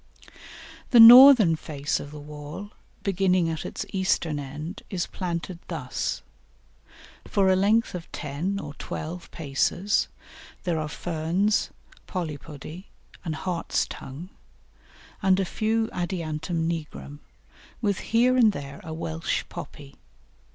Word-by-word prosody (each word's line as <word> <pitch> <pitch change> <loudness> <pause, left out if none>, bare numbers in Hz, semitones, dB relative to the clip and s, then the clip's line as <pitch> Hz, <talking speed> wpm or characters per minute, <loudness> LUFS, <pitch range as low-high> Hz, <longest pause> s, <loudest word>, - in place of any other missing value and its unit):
The 240 - +6
northern 235 -6 +10
face 145 -2 -3
of 140 - -8
the 150 0 -9
wall, 150 +7 -8 0.3
beginning 185 -3 +2
at 160 - -4
its - - -5
eastern 185 -5 0
end, 150 +7 -7
is 180 -3 -2
planted 175 -1 -4
thus: - - -3 1.0
For 195 -2 +2
a 190 - +5
length 210 +4 +2
of 180 -2 -7
ten 165 +8 -3
or 150 -7 -7
twelve 170 +2 -6
paces 165 +6 0 0.6
there 170 -3 0
are 155 -1 -3
Ferns, 175 +6 0 0.4
Polypody 155 0 -6 0.4
and 160 -3 -3
Hartstongue, 170 -2 -3 0.9
and 190 -2 +3
a 195 - +1
few 220 +4 0
Adiantum 165 -2 -2
nigrum, 150 -3 -5 0.6
with 205 -4 0
here 245 +3 +2
and 225 -5 +5
there 140 -2 -7
a 160 0 -6
Welsh 160 0 -2
Poppy. 145 -4 -10
170 Hz, 115 wpm, -26 LUFS, 155-195 Hz, 1.0 s, northern